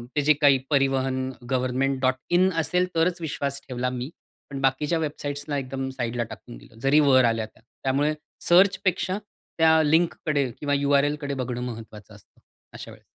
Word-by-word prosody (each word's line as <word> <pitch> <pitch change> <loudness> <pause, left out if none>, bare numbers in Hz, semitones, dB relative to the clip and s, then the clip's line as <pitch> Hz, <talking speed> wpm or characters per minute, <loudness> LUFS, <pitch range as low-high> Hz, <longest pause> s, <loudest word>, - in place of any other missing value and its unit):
ते 150 - +2
जे 150 +2 +5
काही 140 -2 +6
परिवहन 135 -2 +1 0.2
गव्हर्नमेंट 130 +1 0 0.3
.in 185 +2 +4
असेल 180 +3 +1
तरच 170 +2 +1
विश्वास 140 -3 -3
ठेवला 125 0 -2
मी. 125 +2 -5 0.4
पण 135 0 -6
बाकीच्या 145 +5 +1
वेबसाइट्सला 145 -1 -4
एकदम 135 0 -4
साइडला 120 -2 -3
टाकून - - -11
दिलं. 110 - -17
जरी 135 +4 +4
वर 130 -3 +5
आल्या 115 -2 0
त्या, 110 - -21 0.2
त्यामुळे 140 +3 +1 0.4
सर्चपेक्षा 190 +1 +3 0.4
त्या 160 0 +5
लिंककडे 150 -3 +1
किंवा 145 -1 -1
URL 140 +1 +2
कडे 140 -1 -3
बघणं 125 -2 -4
महत्त्वाचं 110 -3 -8
असतं 105 - -22 0.3
अशा - - -9
वेळेस. - - -16
140 Hz, 155 wpm, -25 LUFS, 130-150 Hz, 0.4 s, काही